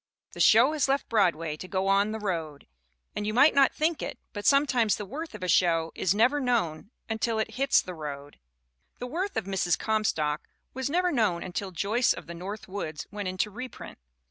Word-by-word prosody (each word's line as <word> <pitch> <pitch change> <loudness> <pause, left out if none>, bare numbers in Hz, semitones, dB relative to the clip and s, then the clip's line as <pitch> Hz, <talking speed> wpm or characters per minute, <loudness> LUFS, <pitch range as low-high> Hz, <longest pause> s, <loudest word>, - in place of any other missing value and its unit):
The - - -11
show - - +6
has 295 -3 +1
left 275 +1 +1
Broadway 170 -8 +1
to 185 - -8
go 190 +1 -1
on 200 +2 +3
"the 220 - -3
road." 165 -8 -4 0.5
And, 205 - -3
you 215 - -2
might 285 +5 +6
not 275 -1 +5
think 315 0 -1
it, - - -5 0.2
but 205 -1 -3
sometimes 270 -6 +3
the 210 - -6
worth 300 - -7
of 205 - -8
a - - -2
show 165 -1 +2
is 190 +2 0
never 250 +7 +3
known 220 - -1 0.2
until 225 0 -1
it 220 - -1
hits 270 +2 +2
"the 185 - -7
road." 145 -3 -8 0.6
The 245 - -5
worth 360 +10 -3
of 220 - -1
Mrs. 185 -4 0
Comstock 165 -9 -1 0.3
was 265 +1 -3
never 360 +3 +1
known 210 - +1
until 190 +2 -4
Joyce 205 +8 +1
of - - -9
the 170 - -8
North 195 +5 -7
Woods 160 -6 -5
went 205 -2 -4
into 185 +3 -1
reprint. 250 - -9
205 Hz, 200 wpm, -27 LUFS, 175-250 Hz, 0.6 s, show